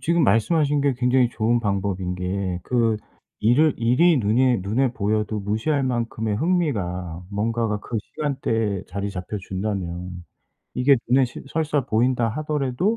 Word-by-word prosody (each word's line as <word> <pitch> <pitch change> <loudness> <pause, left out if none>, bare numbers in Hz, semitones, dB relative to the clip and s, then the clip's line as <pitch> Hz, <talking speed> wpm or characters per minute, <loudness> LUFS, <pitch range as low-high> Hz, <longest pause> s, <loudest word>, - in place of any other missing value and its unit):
지금 170 -1 +2
말씀하신 145 +6 +2
게 140 -1 +2
굉장히 125 0 +3
좋은 120 +1 +1
방법인 95 -3 -1
게 90 0 -3
그 115 -3 +1 0.4
일을 135 +7 +4
일이 125 +9 +4
눈에 120 +1 +3
눈에 120 +6 +1
보여도 105 0 -1
무시할 110 +9 0
만큼의 115 -4 -1
흥미가 95 - -1
뭔가가 110 +1 -1
그 115 0 -3
시간대에 115 -9 -2
자리 100 +2 -3
잡혀 95 +3 -5
준다면 90 -3 -4 0.5
이게 130 +2 +4
눈에 130 +1 +5
시 120 - -10
설사 150 -4 0
보인다 120 0 +2
하더라도 150 - -1
115 Hz, 305 characters per minute, -23 LUFS, 100-135 Hz, 0.5 s, 눈에